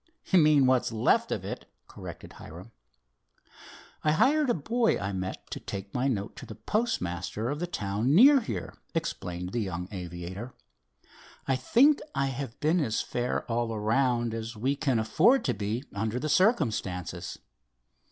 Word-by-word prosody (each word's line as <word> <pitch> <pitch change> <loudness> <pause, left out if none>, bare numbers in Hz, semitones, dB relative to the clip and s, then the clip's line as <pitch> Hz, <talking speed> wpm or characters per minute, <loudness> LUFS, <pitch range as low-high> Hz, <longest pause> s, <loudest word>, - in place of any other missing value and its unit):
"You 190 - +4
mean 150 -3 +5
what 130 -1 +4
is - - -4
left 110 -1 +2
of - - -2
it," - - -6 0.2
corrected - - -10
Hiram. 90 +9 -11 1.3
"I 150 - +3
hired 285 - +3
a - - +3
boy 225 - +1
I 100 0 -3
met 95 0 -5
to - - -4
take 100 0 -7
my 125 +2 0
note 100 -7 -2
to - - -9
the - - -8
postmaster 110 - -2
of 145 - -3
the 175 - -2
town 110 - 0
near 275 +8 +8
here," 100 - -5 0.2
explained 90 0 -3
the 120 - -1
young 90 -3 -4
aviator. 90 +5 -7 0.9
"I 135 - +2
think 255 - +4 0.2
I 140 - +1
have 135 -2 -6
been 160 +4 +2
as 110 -9 0
fair 125 0 -2
all 115 0 -1
around 120 +2 +1
as 115 +1 -5
we 130 +6 0
can 135 -4 0
afford 155 - +3
to - - +1
be 105 +5 -3
under 110 +3 -2
the 155 +3 -3
circumstances." 105 - 0
120 Hz, 160 wpm, -28 LUFS, 100-150 Hz, 1.3 s, near